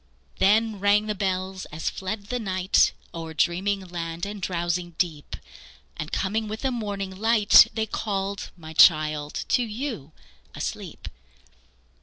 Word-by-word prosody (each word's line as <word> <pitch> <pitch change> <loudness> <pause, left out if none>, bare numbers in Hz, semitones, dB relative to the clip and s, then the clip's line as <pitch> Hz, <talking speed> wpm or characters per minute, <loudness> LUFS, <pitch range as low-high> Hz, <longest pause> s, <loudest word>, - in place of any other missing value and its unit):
Then 215 +2 +3
rang 205 +2 +3
the 215 - -1
bells 190 -1 -2
as 155 +2 -4
fled 200 +2 -5
the 250 - -1
night 185 -3 +2 0.2
O'er 165 -2 -7
dreaming 195 +5 +1
land 170 -2 -5
and 205 0 -6
drowsing 175 -1 -2
deep, 160 -5 -2 0.6
And 150 - -6
coming 215 +3 -1
with 215 +1 -5
the 265 - 0
morning 200 -5 -4
light, 215 0 +6
They 220 -1 0
called, 200 -2 -3
my 160 -2 -10
child, 155 -2 +4
to - - +3
you 225 - -4 0.4
asleep. - - -6
190 Hz, 135 wpm, -25 LUFS, 170-210 Hz, 0.6 s, light